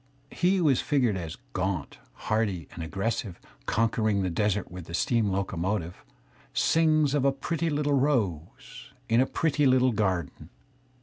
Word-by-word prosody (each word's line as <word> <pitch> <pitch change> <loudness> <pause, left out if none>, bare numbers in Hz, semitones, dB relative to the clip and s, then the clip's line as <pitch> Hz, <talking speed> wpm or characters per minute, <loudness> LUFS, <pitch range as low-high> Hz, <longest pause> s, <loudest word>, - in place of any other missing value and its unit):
He 180 +3 +2
who 175 -4 +2
is 135 - +3
figured 125 -8 +1
as 85 -2 -5 0.2
gaunt, 95 -5 -3 0.3
hardy 105 -6 0
and 85 - -7
aggressive, 95 +3 -3 0.3
conquering 110 -3 +1
the 90 - -1
desert 105 +2 -1
with 90 -2 -8
the 85 - -5
steam 115 +1 +1
locomotive, 95 -1 -2 0.5
sings 155 -3 +3
of 145 -3 +1
a 140 - +4
pretty 165 +4 -2
Uttle 145 -2 +1
rose 125 - -2
in 115 +1 +4
a 130 - +2
pretty 150 -3 +1
little 130 0 +4
garden. 95 -8 -2
110 Hz, 145 wpm, -27 LUFS, 95-140 Hz, 0.5 s, a